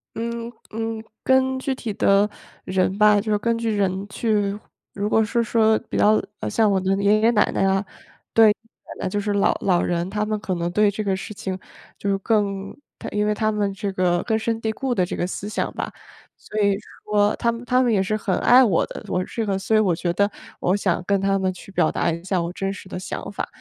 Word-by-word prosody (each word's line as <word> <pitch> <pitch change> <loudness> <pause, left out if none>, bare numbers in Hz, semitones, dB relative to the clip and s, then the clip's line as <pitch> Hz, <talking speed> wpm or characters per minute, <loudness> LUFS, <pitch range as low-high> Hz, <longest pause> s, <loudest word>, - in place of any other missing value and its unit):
嗯， 235 +1 -4 0.2
嗯。 225 0 -3 0.2
跟 260 0 +3
具 265 +1 -2
体 235 -5 -5
的 200 +1 +3 0.4
人 185 +1 0
吧 210 0 +6
就 215 +1 -3
是 210 - +3
根 230 +2 0
据 230 0 -1
人 195 -1 0
去 205 -2 0 0.3
如 205 +1 -2
果 220 0 +4
是 235 +2 0
说 220 -1 +3
比 - - -2
较 215 +1 +4 0.2
呃， - - -2
像 220 -2 +3
我 195 -1 +2
的 190 +1 +1
爷 210 +2 +4
爷、 230 +2 +5
奶 210 -3 +3
奶 - - +1
啊 195 +1 +2 0.5
对， 225 -1 +7
奶 225 +2 -6
奶 - - 0
就 205 - -1
是 205 0 -2
老 200 - +2
老 180 -3 +2
人 175 0 -1
他 210 +1 -1
们 215 0 -1
可 190 - -2
能 170 0 -1
对 210 +2 +3
这 210 - -4
个 195 -2 0
事 190 +3 -7
情 190 -2 -4 0.4
就 200 - -3
是 195 - +2
更 200 -2 -1 0.2
他 - - -7
因 210 0 0
为 210 - +2
他 215 +1 0
们 205 -2 0
这 200 +1 -3
个 180 -2 +1
根 220 -2 +1
深 225 0 -1
蒂 225 - -2
固 265 +1 -2
的 185 -5 +2
这 - - -5
个 - - -1
思 185 +2 -5
想 210 - -2
吧。 - - -3 0.4
所 215 - -6
以 200 -1 +3 0.3
说 210 0 +2
他 235 0 +1
们 230 +1 -7
他 250 +1 +2
们 240 -3 +2
也 190 - +3
是 215 +3 -1
很 195 -3 -1
爱 250 +2 +7
我 205 -10 +3
的， - - -8
我 180 -1 0
这 225 +4 -3
个 195 -2 0
所 195 +3 0
以 - - +5
我 190 -6 +2
觉 175 +1 -1
得 200 +4 +2 0.3
我 180 - +2
想 190 -3 0
跟 200 -1 +2
他 195 0 +2
们 190 -1 0
去 185 - -13
表 - - +2
达 - - 0
一 165 +1 -4
下 185 -1 0
我 170 +1 -3
真 195 +1 -3
实 185 -1 -11
的 180 - -5
想 185 - -6
法， - - -4
205 Hz, 260 characters per minute, -23 LUFS, 195-220 Hz, 0.5 s, 对